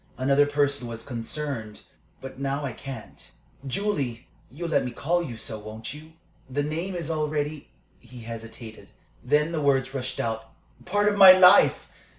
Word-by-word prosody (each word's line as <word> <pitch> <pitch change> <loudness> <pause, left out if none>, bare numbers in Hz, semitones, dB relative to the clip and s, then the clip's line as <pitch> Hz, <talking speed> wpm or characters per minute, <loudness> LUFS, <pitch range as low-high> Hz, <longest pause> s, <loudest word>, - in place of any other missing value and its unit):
Another 140 +3 +3
person 140 -3 0
was 115 -1 -7
concerned. 120 -2 -5 0.4
But 135 0 -9
now 140 +1 -2
I 130 - -4
can't. 130 -2 -9 0.4
Julie! 135 - -2 0.2
you'll 165 +8 -6
let - - +2
me 125 - -3
call 165 +8 -1
you 125 -9 -6
so, 110 0 -5
won't 110 +3 -8
you? 155 +2 -13 0.4
The 145 +3 -1
name 165 +6 -3
is 165 -2 -3
already" 150 -1 -2 0.3
he 125 -2 -13
hesitated; 115 0 -9 0.3
then 150 +4 +2
the 160 -2 -2
words 135 -2 +1
rushed 130 -1 -4
out 115 0 -3 0.3
"part 205 +2 +1
of 205 -1 +1
my 190 -1 +12
life! 185 +1 +6
140 Hz, 160 wpm, -25 LUFS, 120-155 Hz, 0.4 s, my